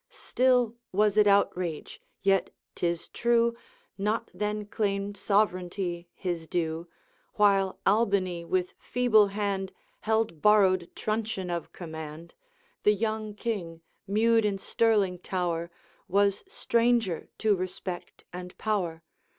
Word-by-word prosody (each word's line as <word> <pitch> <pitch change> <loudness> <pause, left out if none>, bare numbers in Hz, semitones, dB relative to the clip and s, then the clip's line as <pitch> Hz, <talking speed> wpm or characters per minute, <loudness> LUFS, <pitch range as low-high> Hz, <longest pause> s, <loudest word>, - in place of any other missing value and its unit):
'Still 250 -3 +2 0.2
was 210 +1 +2
it 210 -1 +5
outrage; 180 -5 +1 0.2
yet, 195 -1 +3 0.2
'tis 170 -1 -2
true, 235 0 +2 0.4
Not 210 +3 -1
then 210 +2 -2
claimed 200 -1 -2
sovereignty 185 -4 0
his 170 -3 -3
due; 165 0 -2 0.5
While 195 -3 +3
Albany 195 -4 +2
with 180 +1 -1
feeble 235 -4 +4
hand 195 -1 -2 0.3
Held 220 - 0
borrowed 190 -4 +4
truncheon 215 -4 -2
of 170 -1 -4
command, 160 -1 -8 0.5
The 210 - +5
young 215 0 -2
King, 190 -8 -4 0.3
mewed 225 +3 +3
in 205 -2 0
Stirling 195 -3 +1
tower, 170 -2 -2 0.4
Was 200 +1 +2
stranger 235 -6 +1
to 215 -2 +3
respect 185 -1 -6
and 180 0 -8
power. 180 -7 -1
195 Hz, 110 wpm, -28 LUFS, 180-215 Hz, 0.5 s, it